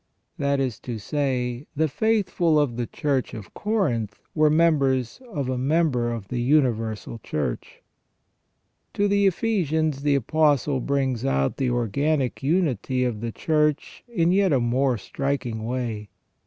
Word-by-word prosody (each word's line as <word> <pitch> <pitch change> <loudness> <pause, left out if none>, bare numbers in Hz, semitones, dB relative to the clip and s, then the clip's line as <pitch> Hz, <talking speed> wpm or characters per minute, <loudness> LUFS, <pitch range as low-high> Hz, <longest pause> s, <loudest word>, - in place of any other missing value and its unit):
That 140 0 +1
is 130 -4 -2
to 120 -3 -5
say, 125 +1 -2
the 155 +2 +2
faithful 185 -3 +1
of 140 -6 0
the 120 -1 -2
Church 140 -4 -1
of 105 -3 -10
Corinth 125 - -1
were 155 -1 +4
members 145 - +2
of 145 -8 -2
a 130 -1 -1
member 135 -4 +1
of 115 -5 -6
the 120 -1 -2
universal 115 -5 0
Church. 75 - -4 1.1
To 205 - +2
the 200 0 +3
Ephesians 160 -8 0
the 145 0 +2
Apostle 145 +1 +2
brings 135 -2 -1
out 70 0 0
the 130 -2 0
organic 125 +4 0
unity 135 - 0
of 120 -4 -2
the 115 -1 -3
Church 150 +2 0
in 175 -8 +1
a - - +3
yet 190 -9 +3
more 125 +1 +1
striking 125 -1 -3
way. 115 -4 -3
135 Hz, 140 wpm, -24 LUFS, 120-155 Hz, 1.1 s, were